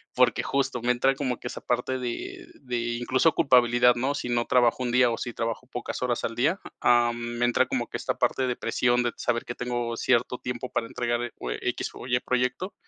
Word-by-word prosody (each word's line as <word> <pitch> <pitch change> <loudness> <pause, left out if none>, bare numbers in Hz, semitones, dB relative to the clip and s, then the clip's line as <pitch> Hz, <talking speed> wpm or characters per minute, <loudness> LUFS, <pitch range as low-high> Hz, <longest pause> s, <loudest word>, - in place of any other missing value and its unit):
porque - - +3
justo 135 -3 -1
me 120 - +2
entra 130 +2 +2
como 130 -3 -2
que - - -6
esa - - -6
parte 125 +2 -1
de 355 - -5
de 125 -2 -3 0.2
incluso 130 +6 +2
culpabilidad, 125 -5 +5
¿no?, 135 +4 -1
si 125 - -4
no 120 -1 +1
trabajo 125 0 +3
un 125 - -1
día 125 0 +4
o 115 - -2
si 120 - -4
trabajo 115 +2 -3
pocas 125 -1 -5
horas 125 -2 -1
al 115 - -2
día, 155 - +1 0.2
ah, 120 -1 +4
mm, 120 0 -5
me 120 - +2
entra 120 - +2
como - - -1
que - - -4
esta - - -2
parte 130 - +1
de 125 - -1
presión 120 +1 +1
de 120 - 0
saber 120 -1 -1
que 120 - -4
tengo 120 -1 -2
cierto 125 0 +1
tiempo 125 0 -5
para 115 - -1
entregar 120 0 -1
e 120 - -3
cue - - -5
equis - - -2
o - - -9
ye 125 0 +1
proyecto, 125 +9 -1
125 Hz, 230 wpm, -26 LUFS, 120-130 Hz, 0.2 s, culpabilidad